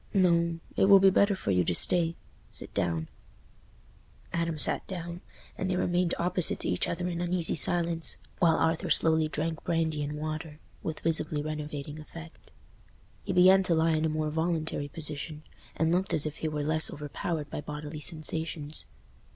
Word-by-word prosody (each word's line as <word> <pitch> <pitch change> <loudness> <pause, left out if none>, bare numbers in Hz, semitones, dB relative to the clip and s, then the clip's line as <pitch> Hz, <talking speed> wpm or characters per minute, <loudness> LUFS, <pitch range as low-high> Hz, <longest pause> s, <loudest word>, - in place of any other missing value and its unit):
"No: 170 -3 +3 0.2
it - - +4
will 200 0 +9
be 195 0 +6
better 200 +1 +4
for 145 - -2
you 90 -1 +3
to 90 +1 0
stay—sit 170 - -2
down." 85 -2 -1 1.3
Adam 170 -1 -1
sat - - +3
down, 175 -1 -6 0.3
and 190 - -3
they 185 - +1
remained 175 -1 +1
opposite 180 0 +1
to - - 0
each 90 - +1
other 175 +1 -2
in 170 -1 -3
uneasy 175 -1 0
silence, 170 -1 +1 0.2
while 165 -3 +5
Arthur 160 0 +1
slowly 160 -1 +3
drank 155 +1 -3
brandy 165 -3 0
and 145 0 -3
water, 155 0 -5 0.2
with 160 - -5
visibly 155 -2 +1
renovating 150 -1 -5
effect. 165 +1 -12 0.7
He - - -4
began 185 +1 +6
to 180 -3 +1
lie 160 +1 +3
in 155 0 +1
a - - +1
more 155 0 -1
voluntary 160 -2 -1
position, 150 0 -5 0.3
and 160 +1 +1
looked 185 +2 +1
as 155 - +2
if 155 -1 -4
he 160 - -2
were 150 -1 -2
less 155 +1 +1
overpowered 150 +1 -4
by - - -4
bodily 150 +1 -6
sensations. 155 -1 -2
160 Hz, 165 wpm, -29 LUFS, 150-170 Hz, 1.3 s, will